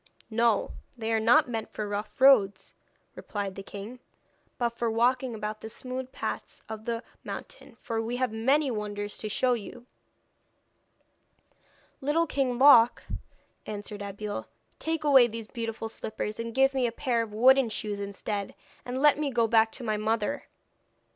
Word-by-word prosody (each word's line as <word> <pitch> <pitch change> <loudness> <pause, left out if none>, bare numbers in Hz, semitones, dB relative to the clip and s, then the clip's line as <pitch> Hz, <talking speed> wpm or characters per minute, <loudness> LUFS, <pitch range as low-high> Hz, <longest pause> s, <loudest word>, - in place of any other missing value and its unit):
'No, 230 -1 +2 0.3
they 225 -1 -2
are 220 - +3
not 245 +8 +5
meant 225 -2 -4
for 215 - -4
rough 205 +3 -5
roads,' 255 -7 +5 0.4
replied 200 -2 -4
the 195 - -7
king, 205 +5 -8 0.6
'but 240 -1 +1
for 235 0 -2
walking 245 +2 +1
about 215 0 -5
the 220 - -7
smooth 255 +2 -6
paths - - -5
of 220 0 -7
the 230 0 -2 0.2
mountain, - - -8
for 225 -1 -3
we 235 +2 -3
have 255 -2 0
many 265 +6 +2
wonders 205 -1 -4
to 215 - -4
show 250 +4 +2
you.' 235 +1 -6 2.2
'Little 300 +5 +2
King 265 -5 0
Loc,' 250 -3 +7 0.6
answered 205 0 -6
Abeille, 205 +1 -5 0.3
'take 320 -1 -2
away 270 -5 +7
these 225 -1 -7
beautiful 225 -2 -4
slippers 215 -1 -5
and 230 0 -5
give 270 +1 +4
me 260 -2 +1
a - - -2
pair 235 -1 0
of 225 -2 -5
wooden 255 +3 +5
shoes 210 -1 -4
instead, 200 0 -4 0.3
and 255 +2 -3
let 295 -1 +6
me 300 -2 0
go 235 -3 +2
back 225 0 +4
to 255 - -6
my 215 -2 0
mother.' 215 0 -1
230 Hz, 160 wpm, -28 LUFS, 215-255 Hz, 2.2 s, Loc